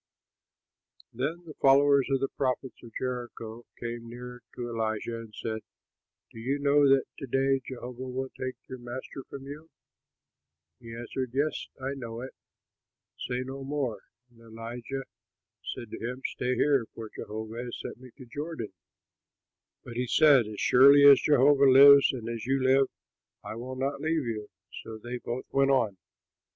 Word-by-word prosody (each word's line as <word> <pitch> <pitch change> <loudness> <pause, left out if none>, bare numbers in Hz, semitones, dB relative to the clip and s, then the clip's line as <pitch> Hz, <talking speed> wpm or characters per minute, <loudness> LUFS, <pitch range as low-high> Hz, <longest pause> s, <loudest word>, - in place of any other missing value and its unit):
Then 150 +9 -3
the 155 - -9
followers 140 0 +5
of 135 -1 +1
the 135 - +1
prophets 130 -1 -2
at 120 - -10
Jericho 120 -2 -5
came 120 0 -5
near 125 +1 -9
to 120 - -4
Elisha 115 0 -2
and 110 -2 -11
said, 110 -1 -3 0.7
"Do 115 - -11
you 135 +5 -1
know 145 0 +4
that 135 -1 +5 0.2
to 135 - -6
day 135 +1 +2
Jehovah 125 -1 -8
will 130 +1 -3
take 130 0 -4
your 130 - -8
master 120 +3 -7
from 135 -1 -8
you?" 150 +3 -9 1.1
He 115 -2 -9
answered, 120 +1 -5
"Yes, 150 +3 0
I 135 +1 -3
know 115 -4 -6
it; 130 - -7 0.9
say 125 0 -2
no 135 +1 -7
more." 135 -6 -2 0.3
And 115 - -23
Elijah 115 +4 -6 0.6
said 115 -3 -7
to - - -6
him, 125 +3 -5
"Stay 125 +1 -1
here, 140 -6 +2
for 110 -1 -8
Jehovah 110 +2 -6
has 120 - -6
sent - - -7
me 130 0 -12
to 130 - -11
the 115 - -25
Jordan." 150 -6 -5 1.1
But 120 -1 -8
he 125 0 -1
said, 140 -5 +5
"As 105 -1 -7
surely 140 +3 +7
as 140 -2 +9
Jehovah 140 -1 +5
lives 140 +1 +9
and 120 -4 -6
as 115 0 -5
you 135 0 +1
live, 135 +1 +4 0.6
I - - -6
will 125 +3 -6
not 140 +2 -2
leave 160 -2 0
you." 110 -3 -4 0.3
So 110 -1 -8
they 120 +3 -6
both 120 +1 -5
went 135 0 +3
on. 115 -8 +2
130 Hz, 165 wpm, -28 LUFS, 115-135 Hz, 1.1 s, as